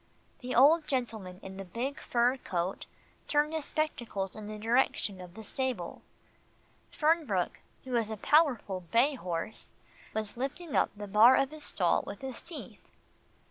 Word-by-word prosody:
The 250 0 -4
old 300 +5 +6
gentleman 220 -9 -3
in 190 0 -8
the 195 - -5
big 240 +9 -4
fur 245 +2 +2
coat 180 -5 -3 0.4
turned 300 +1 +2
his 315 -2 -1
spectacles 235 - -2
in 215 -1 -8
the 215 0 -6
direction 220 -4 +1
of 180 0 -11
the 220 - -8
stable. 245 -7 -3 0.9
Fernbrook, 300 - +1 0.2
who 255 -2 -3
is 225 -2 0
a 220 - -4
powerful 250 - +3
bay 235 - +2
horse, 180 -3 -5 0.4
was 220 0 -2
lifting 280 +5 -4
up - - +4
the 205 - -5
bar 220 +6 +7
of 275 +1 +2
his 310 -1 -5
stall - - +2
with - - -7
his 265 -2 -5
teeth. 335 -2 -9
235 Hz, 155 wpm, -30 LUFS, 200-275 Hz, 0.9 s, bar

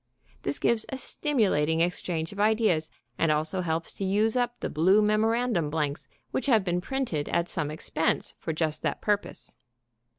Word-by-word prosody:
This - - -2
gives 230 -2 +2
a 265 - -3
stimulating 190 - +1
exchange 170 -2 -1
of 200 - -9
ideas, 210 -7 +2 0.3
and 165 - +3
also 155 +5 0
helps 165 -1 -2
to - - -5
use 210 +4 +2
up 245 -1 0
the - - -2
blue 185 +7 +4
memorandum 215 -4 +2
blanks 150 0 -2 0.2
which 265 - -1
have 225 -6 +4
been 180 -1 0
printed 235 - -2
at 170 0 +1
some 150 -5 -1
expense 160 +1 -1
for - - -3
just 155 -1 -1
that - - -1
purpose. 205 -1 -2
180 Hz, 165 wpm, -27 LUFS, 160-220 Hz, 0.3 s, blue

